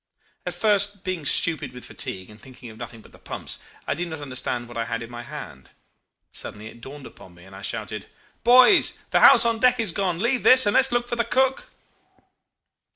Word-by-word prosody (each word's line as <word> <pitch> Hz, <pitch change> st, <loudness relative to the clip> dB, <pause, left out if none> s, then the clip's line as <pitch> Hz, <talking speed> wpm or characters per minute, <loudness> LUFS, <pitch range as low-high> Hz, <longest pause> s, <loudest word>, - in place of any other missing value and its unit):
At -, -, -4 dB
first, 205 Hz, -2 st, +1 dB
being 185 Hz, -5 st, -4 dB
stupid 160 Hz, -1 st, 0 dB
with 125 Hz, -, -10 dB
fatigue 95 Hz, +2 st, -6 dB
and 105 Hz, -, -16 dB
thinking 125 Hz, -3 st, -12 dB
of 110 Hz, -, -15 dB
nothing 115 Hz, -1 st, -9 dB
but -, -, -19 dB
the -, -, -18 dB
pumps, -, -, -7 dB, 0.3 s
I -, -, -1 dB
did 175 Hz, +1 st, -4 dB
not 160 Hz, -2 st, -7 dB
understand 130 Hz, -3 st, -4 dB
what 120 Hz, -, -12 dB
I 115 Hz, 0 st, -2 dB
had 115 Hz, +1 st, -4 dB
in 115 Hz, -, -11 dB
my 120 Hz, 0 st, -7 dB
hand. 65 Hz, -, -10 dB, 0.6 s
Suddenly 105 Hz, +1 st, -6 dB
it 120 Hz, -, -16 dB
dawned 135 Hz, +2 st, -10 dB
upon 90 Hz, -2 st, -14 dB
me, 85 Hz, -, -17 dB
and 95 Hz, 0 st, -14 dB
I 95 Hz, -, -10 dB
shouted, -, -, -5 dB, 0.4 s
'Boys, 255 Hz, -, +6 dB
the -, -, +4 dB
house -, -, +7 dB
on 230 Hz, -1 st, +1 dB
deck 250 Hz, +1 st, +3 dB
is 220 Hz, -6 st, +1 dB
gone. 180 Hz, -1 st, -1 dB
Leave 235 Hz, +6 st, 0 dB
this, 255 Hz, -1 st, +7 dB
and 205 Hz, -, +2 dB
let's 265 Hz, 0 st, +4 dB
look 240 Hz, 0 st, 0 dB
for 240 Hz, -, -3 dB
the 235 Hz, -, +2 dB
cook. 265 Hz, +3 st, 0 dB
165 Hz, 215 wpm, -23 LUFS, -, 0.6 s, house